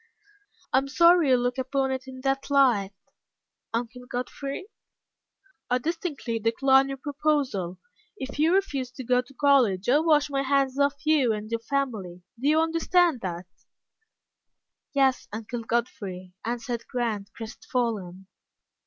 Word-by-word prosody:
"I 260 - +6
am 270 - -5
sorry 335 +1 +5
you 255 - +6
look 245 +1 -1
upon 265 +1 0
it 260 0 -4
in 260 0 -9
that 270 +1 -1
light, 250 -9 +3 0.8
Uncle 245 +2 -4
Godfrey." 275 +7 -4 1.0
"I 250 - +3
distinctly 295 -5 -3
decline 265 +5 +4
your 270 - -4
proposal. 275 - -1 0.4
If 270 -4 -6
you 315 +2 +4
refuse 280 -10 0
to 260 - -7
go 250 +1 +2
to 250 +2 -18
college, 250 -10 +3
I 280 +4 +5
wash 305 -2 +3
my 275 -1 +1
hands 275 0 +1
of 280 0 +3
you 290 -7 +3
and 215 +1 -6
your 230 - 0
family. 225 -9 -3 0.2
Do 270 - -1
you 310 +1 +4
understand 330 -2 +2
that?" 180 -1 -4 1.5
"Yes, 270 -2 +2
Uncle 225 +2 -5
Godfrey," 195 -6 -3
answered 235 0 -4
Grant, 215 -5 -2
crestfallen. 220 -5 -4
260 Hz, 135 wpm, -26 LUFS, 230-280 Hz, 1.5 s, I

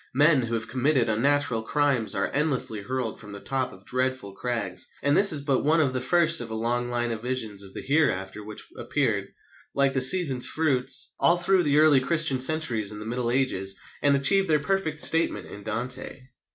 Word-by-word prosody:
Men 145 0 +4
who 115 -1 -3
have 115 0 -4
committed 130 0 0
unnatural 130 +1 +1
crimes 130 -4 0
are - - -1
endlessly 135 -7 0
hurled 125 0 -4
from 105 -2 -11
the 100 - -8
top 130 +3 -3
of 95 +1 -16
dreadful 130 -5 -3
crags. 100 -5 -4 0.2
And 140 +1 +2
this 200 0 +6
is 150 -3 +1
but 140 -2 0
one 160 +3 +2
of 140 -5 +1
the 130 - -2
first 170 -2 +3
of - - -7
a 110 - -5
long 120 +2 -1
line 120 -1 -2
of 110 -2 -5
visions 115 -5 -3
of 95 -1 -11
the - - -7
hereafter 105 -9 -1
which 105 0 -10
appeared, - - -1 0.5
like 140 -1 +2
the 130 - 0
season's 130 -2 +3
fruits, 130 -4 -1
all 170 - +4
through 185 +1 +2
the 145 -3 +1
early 155 -3 +5
Christian 155 -1 +1
centuries 130 -7 +1
and 105 - -8
the 105 - -8
Middle 120 +1 -2
Ages, 110 -7 0 0.3
and 140 -1 +3
achieved 190 +8 +2
their 155 -1 +3
perfect 160 -1 -2
statement 165 +1 +2
in 105 - -11
Dante. 125 +6 -4
130 Hz, 200 wpm, -25 LUFS, 115-150 Hz, 0.5 s, this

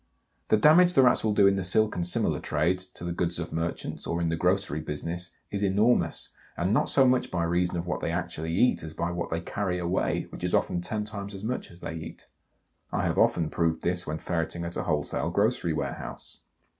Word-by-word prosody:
The 110 - +4
damage 175 +9 +6
the 135 - +6
Rats 125 - +4
will 110 -2 +1
do 100 - +6
in 100 0 +4
the 95 - -1
silk 105 +4 +2
and 90 - -1
similar 90 - +1
trades, 85 +5 0
to 90 - -12
the 85 - -2
goods 85 0 -1
of 85 -1 -5
merchants, 80 +1 -3
or 85 - -1
in 85 -1 0
the 80 - 0
grocery 90 -2 +1
business, 85 +3 -4 0.2
is 100 - -2
enormous, 105 +5 +2 0.3
and 90 +4 +1
not - - +2
so 135 - +5
much 125 0 +2
by 85 -2 -1
reason 90 +1 +1
of 85 - -3
what 90 - -3
they - - -1
actually 80 +1 -3
eat 100 +9 +3
as 80 0 -8
by 85 - -1
what 85 0 -3
they 80 +1 -2
carry 90 0 -2
away, 90 +1 0
which - - -9
is - - +1
often 90 - +1
ten 105 +3 -2
times 100 -1 -6
as 95 - -8
much 125 +3 -3
as 85 - -14
they - - -5
eat. 80 -1 -8 0.7
I - - 0
have - - 0
often 80 -2 +2
proved 80 -1 0
this 90 0 -1
when 75 +1 -2
ferreting 85 +1 -2
at 85 - -5
a - - -3
wholesale 75 -1 -1
grocery 100 -1 +1
warehouse. 75 -3 -4
90 Hz, 225 wpm, -27 LUFS, 85-100 Hz, 0.7 s, damage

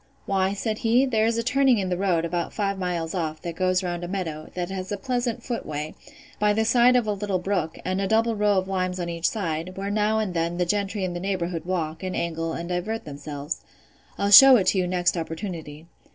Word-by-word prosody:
Why, 190 0 +1
said 215 +1 -2
he, 245 +2 +3
there 220 -4 +2
is 230 0 0
a 230 - 0
turning 260 0 +3
in 190 -2 -1
the 180 - 0
road, 175 -3 +1
about 170 0 -2
five 200 -2 -1
miles 175 -3 -2
off, 160 -4 -2
that 170 -1 -5
goes 185 +1 +1
round 175 -1 -3
a - - -3
meadow, 170 -5 -4
that 180 0 -3
has 190 0 -5
a 205 - -1
pleasant 245 +2 -2
foot 240 -2 -3
way, 150 0 -5 0.5
by 210 0 +3
the 220 +1 +1
side 245 +2 +5
of 245 -2 +3
a 210 - 0
little 200 -1 -1
brook, 180 -3 -2
and 185 +1 -1
a 195 - 0
double 225 +1 +2
row 205 -1 +2
of 185 0 0
limes 185 -1 -2
on 175 -1 -3
each 170 0 0
side, 180 -3 -4
where 200 +1 -3
now 215 +1 +1
and 215 -4 -1
then 170 0 -1
the 180 - +1
gentry 200 +2 -1
in 180 -1 -2
the 175 - -4
neighbourhood 175 -3 -2
walk, 165 -3 -2
and 185 -1 -4
angle, 165 -1 -2
and 170 +1 -5
divert 190 +6 -3
themselves.—I'll 150 +7 -6
shew 270 +6 +11
it 190 -3 +2
you 185 -2 +1
next 180 0 +1
opportunity. 165 -2 -6
185 Hz, 225 wpm, -25 LUFS, 170-210 Hz, 0.5 s, shew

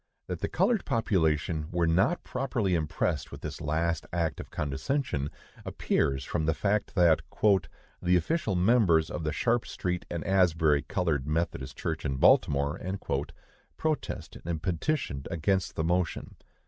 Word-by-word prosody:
That - - -4
the - - -1
colored 230 -5 +2
population 80 -7 0
were 85 -1 +1
not 95 - +2
properly 120 -7 -1
impressed 80 -3 -1
with - - -9
this - - -6
last 80 +1 -1
act 85 -2 -1
of - - -7
condescension, 75 - -2 0.3
appears 70 -1 0
from 80 -2 -1
the 80 - +2
fact 105 +6 0
that 85 -4 +5 0.8
"the 90 0 +3
official 110 - 0
members 90 -5 +3
of 85 - -4
the 75 - 0
Sharp 115 - +1
street 90 -1 -3
and 85 -2 -3
Asbury 80 -6 +3
Colored 75 -4 -1
Methodist 75 -3 -2
Church - - -3
in 70 - -1
Baltimore" 70 +2 +3 1.0
protested 155 -1 -3
and 80 -1 -3
petitioned 90 - -1
against 95 +4 0
the 80 - -1
motion. 85 +1 -1
85 Hz, 140 wpm, -29 LUFS, 75-95 Hz, 1.0 s, that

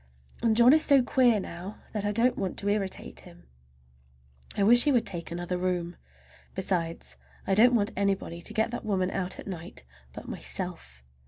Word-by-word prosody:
And 225 -1 +2
John 240 +3 +7
is 315 - +6
so 275 -3 +6
queer 245 -3 +3
now, 185 +2 -8 0.2
that 210 -2 -3
I 205 - 0
don't 235 +4 +2
want 190 -3 -4
to 200 - -2
irritate 200 -2 -3
him. 175 -1 -15 1.1
I 200 - +2
wish 240 +5 +7
he 295 - +3
would 245 -4 +2
take 170 -4 -5
another 175 +1 -4
room! 180 -1 -2 0.6
Besides, 175 -3 -3 0.3
I 195 - 0
don't 240 +5 +5
want 210 -1 +1
anybody 195 -3 -2
to - - -5
get 220 +1 +1
that 240 - -5
woman 190 -3 -1
out 185 -1 -3
at - - -10
night 175 - -8 0.3
but - - -10
myself. 65 0 -5
195 Hz, 180 wpm, -27 LUFS, 180-230 Hz, 1.1 s, John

